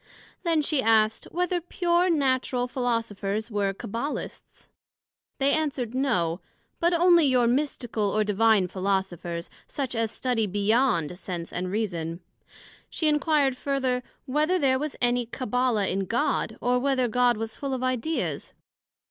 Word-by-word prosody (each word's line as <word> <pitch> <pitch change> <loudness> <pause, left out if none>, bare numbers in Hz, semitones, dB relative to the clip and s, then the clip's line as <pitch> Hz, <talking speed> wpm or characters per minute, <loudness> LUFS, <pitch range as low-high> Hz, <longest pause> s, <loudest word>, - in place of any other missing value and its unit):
Then 330 -3 +1
she 290 -2 +1
asked, 220 -1 +3
Whether 355 0 -1
pure 350 +1 +1
Natural 260 -5 +1
Philosophers 230 -4 -2
were 200 -2 0
Cabbalists? 230 +8 -6 0.7
They 275 +1 +2
answered, 275 -7 -1
No; 190 -11 0 0.4
but 340 +1 +3
onely 345 -1 +5
your 250 -2 +3
Mystical 240 -5 0
or 215 +1 +1
Divine 210 -1 +3
Philosophers, 185 -3 -2 0.2
such 275 -3 -3
as 225 -1 0
study 230 -2 -1
beyond 205 - +1
Sense 175 -3 -6
and 180 +1 -3
Reason. 175 -6 -2 0.7
she 315 - -1
enquired 295 -3 +2
further, 260 -2 -1 0.2
Whether 305 +6 +1
there 265 -5 +2
was 300 0 -3
any 245 -1 +2
Cabbala 250 -3 0
in 195 +1 -1
God, 225 +1 -1
or 250 0 +2
whether 260 -1 +1
God 245 0 +2
was 225 0 -4
full 275 -2 -3
of 255 - -4
Idea's? 255 +5 -2
245 Hz, 135 wpm, -26 LUFS, 210-275 Hz, 0.7 s, onely